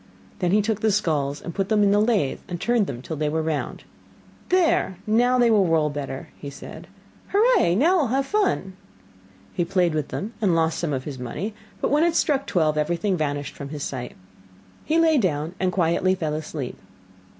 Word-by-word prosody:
Then 180 -3 +1
he 205 +3 +3
took 215 -1 -1
the 220 - +3
skulls 150 -8 0
and 170 - -6
put 195 -1 -2
them 215 -2 +3
in 200 - +4
the 205 - +4
lathe 210 - +1
and 175 -1 -5
turned 235 -2 +1
them 125 -2 -6
till 160 - -5
they 150 0 -1
were 160 +1 -1
round. 155 -2 -3 0.7
'There, 335 - +2
now 245 +4 +3
they 240 -2 +4
will 200 -4 +4
roll 155 -2 +2
better!' 140 -2 -6 0.2
said 140 - -10 0.4
he. 395 - +1
'Hurrah! 430 - +4
now 330 - +4
we'll 295 -6 +2
have 270 +4 0
fun!' 385 - 0 0.8
He 175 - 0
played 175 -1 +1
with 155 -2 -1
them 215 +4 -5
and 190 -5 +3
lost 165 0 +1
some 170 -3 -1
of 130 -2 -2
his 135 -3 -7
money, 155 - -4 0.3
but - - 0
when 295 +2 +4
it 340 -1 +2
struck 275 -3 +1
twelve, 155 -4 +1
everything 175 +5 0
vanished 145 -3 -2
from 140 -1 -7
his 145 -1 -5
sight. 125 -2 -5 0.7
He 320 - +1
lay 325 -3 +4
down 160 -5 -1
and 185 0 +1
quietly 180 +1 +2
fell 160 -4 -2
asleep. 150 -3 -5
180 Hz, 200 wpm, -24 LUFS, 150-225 Hz, 0.8 s, in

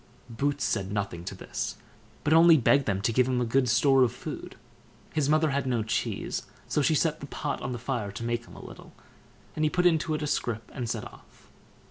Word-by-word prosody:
Boots 140 0 -1
said 100 -1 -1
nothing 100 -5 -3
to - - -5
this, - - -5 0.5
but 150 - +2
only 165 0 +8
begged 140 +1 +3
them 95 -1 0
to 115 - +1
give 125 +2 +3
him 130 -1 +1
a 125 - +1
good 125 +2 +2
store 135 +3 +4
of 125 -2 +4
food. 125 - -7 0.6
His 150 -2 +1
mother 155 0 +3
had 140 -1 -1
no 120 -3 +1
cheese, 110 - -2 0.2
so 150 - +1
she 155 +3 +3
set 160 0 +1
the 140 - -8
pot 145 0 -4
on 130 - -3
the 120 - -3
fire 120 -4 -3
to 115 - -6
make 120 0 -2
him - - -14
a - - -11
little, - - -12 0.6
and 155 - -1
he 155 - +3
put 180 +3 0
it - - +9
into 160 -1 0
a 150 - -2
scrip 115 -6 -2
and 125 -4 -4
set - - -3
off. - - -16
130 Hz, 225 wpm, -28 LUFS, 115-150 Hz, 0.6 s, it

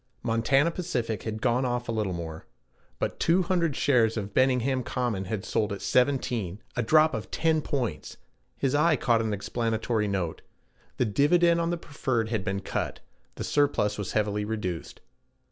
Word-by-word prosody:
Montana 135 +7 +2
Pacific 120 - -2
had 110 -1 -5
gone 125 +1 +2
off 120 -1 -1
a - - -1
little 110 -4 -1
more. 80 -2 -6 0.5
But - - -3
200 170 -3 +2
shares 120 -5 +3
of 100 -1 -4
Benningham 130 0 +2
Common 120 -6 -2
had 95 0 -4
sold 105 -1 0
at 100 - -4
17, 125 -7 +1 0.2
a 125 - +1
drop 155 +7 +4
of - - -4
ten 160 -1 +1
points! 130 -6 -3 0.4
His 135 -1 0
eye 155 +2 +4
caught 115 -4 +2
an 110 -1 -1
explanatory 110 +1 -1
note: 95 -5 -2 0.6
the 125 - +2
dividend 170 - +3
on 165 - 0
the 175 - -1
preferred 130 -7 -2
had 110 -4 -1
been 100 0 -2
cut; - - -3 0.4
the - - -5
surplus 120 -8 +1
was 100 - -4
heavily 105 -1 0
reduced. 105 -6 -4
120 Hz, 160 wpm, -27 LUFS, 105-140 Hz, 0.6 s, drop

